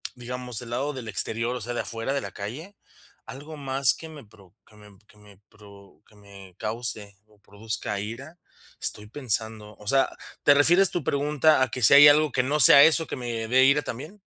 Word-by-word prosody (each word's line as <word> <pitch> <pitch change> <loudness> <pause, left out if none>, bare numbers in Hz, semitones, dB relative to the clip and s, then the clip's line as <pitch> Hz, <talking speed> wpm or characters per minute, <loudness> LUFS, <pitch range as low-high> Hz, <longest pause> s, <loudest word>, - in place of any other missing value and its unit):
digamos, 125 -1 -5
el 120 - -11
lado 140 +4 -3
del 125 -4 -9
exterior, 115 +5 -2
o 125 - -7
sea, 120 +3 -5
de - - -3
afuera 115 +4 -5
de 140 - -2
la - - -8
calle, 150 - -9 0.5
¿algo 150 +3 -11
más 135 -1 0
que 160 - -12
me 150 -7 -13
pro 100 -3 -22
que 105 - -22
me 105 -2 -18
que 105 - -24
me 100 -2 -20
pro 100 -2 -19
que 105 - -24
me 100 -3 -16
cause 110 -2 -2
o 105 -1 -27
produzca 105 0 -6
ira? 130 +11 -9 0.4
Estoy 105 0 -2
pensando, 110 -4 -3
o 105 - -14
sea, 135 +2 +2 0.4
¿te 145 - +5
refieres 175 +6 +4
tu 175 - -4
pregunta 145 0 +1
a - - 0
que 125 - -6
si 105 - +5
hay 145 +1 +9
algo 150 -1 +3
que 125 - -1
no 145 +3 -2
sea 140 +3 +8
eso 160 0 +3
que - - -6
me 115 -2 -5
dé 130 +1 +4
ira 140 +2 +3
también? 155 - -10
120 Hz, 210 wpm, -24 LUFS, 105-145 Hz, 0.5 s, hay